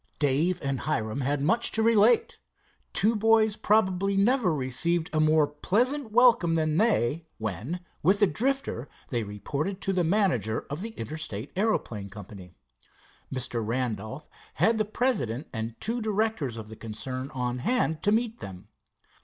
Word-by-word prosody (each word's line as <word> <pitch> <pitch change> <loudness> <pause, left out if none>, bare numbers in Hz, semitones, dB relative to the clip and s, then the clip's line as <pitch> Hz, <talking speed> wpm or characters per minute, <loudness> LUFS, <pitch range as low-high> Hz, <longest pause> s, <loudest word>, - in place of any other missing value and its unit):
Dave 155 +5 +2
and 135 -2 -1
Hiram 130 -4 -2
had 140 +1 0
much 230 +10 +2
to 220 - +2
relate. 230 +1 +4 0.5
Two 220 +3 +2
boys 220 0 +4
probably 195 -2 +2
never 220 -1 +3
received 160 +5 0
a 155 - +2
more 155 0 +4
pleasant 225 - 0
welcome 230 -8 +5
than 155 -1 +1
they, 165 - +1
when 110 - -4 0.2
with 190 +5 +3
the 205 - +6
Drifter 230 - -1 0.2
they 120 -2 -1
reported 140 - -4
to 195 - 0
the 180 -1 +1
manager 165 - +1
of 150 +5 -4
the 225 +1 -6
Interstate 120 -2 -5
Aeroplane 120 - -1
Company. 95 -2 -11 0.8
Mr. 125 -3 -2
Randolph 120 +3 -3 0.3
had 225 0 +3
the 215 - +2
president 205 - -1
and 115 0 -5
two 235 +3 -2
directors 215 - -1
of 110 -1 -7
the 110 - -10
concern 130 +5 -5
on 125 -1 -2
hand 160 - 0
to 205 - +2
meet 230 +1 0
them. 95 -2 -9
160 Hz, 150 wpm, -27 LUFS, -, 0.8 s, the